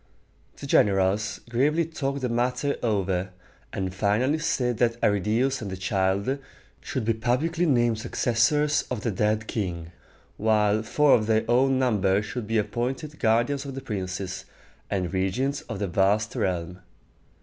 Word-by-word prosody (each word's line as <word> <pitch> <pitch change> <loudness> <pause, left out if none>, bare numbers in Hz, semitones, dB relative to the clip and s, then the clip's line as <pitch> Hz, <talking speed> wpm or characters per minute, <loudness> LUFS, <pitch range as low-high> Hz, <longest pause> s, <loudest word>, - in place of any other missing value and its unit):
The - - -8
generals 100 +1 +2
gravely 145 +8 +1
talked 140 -3 -3
the 125 - 0
matter 125 +4 0
over, 95 -4 0 0.4
and 95 -1 -3
finally 110 +10 +1
said 125 -6 0
that 120 -1 +1
Arridæus 110 +5 +1
and 105 - -5
the 95 - -5
child 100 +6 0 0.4
should 130 -5 -4
be 115 - +2
publicly 145 +10 0
named 120 -5 +2
successors 125 +6 +1
of 125 -4 -3
the 115 - -1
dead 105 +2 0
king, 85 -7 -4 0.5
while 105 -1 +2
four 145 +6 +3
of 110 -2 +3
their 110 0 +2
own 130 +3 +3
number 105 -6 +2
should 105 +1 -5
be 115 +1 0
appointed 125 +8 -3
guardians 120 +5 +2
of 135 -2 -7
the 135 - -5
princes, 95 -4 -4 0.4
and 95 -2 -2
regents 110 +10 0
of - - -4
the 100 0 -2
vast 100 +5 +1
realm. 90 -5 -2
110 Hz, 150 wpm, -26 LUFS, 100-130 Hz, 0.5 s, four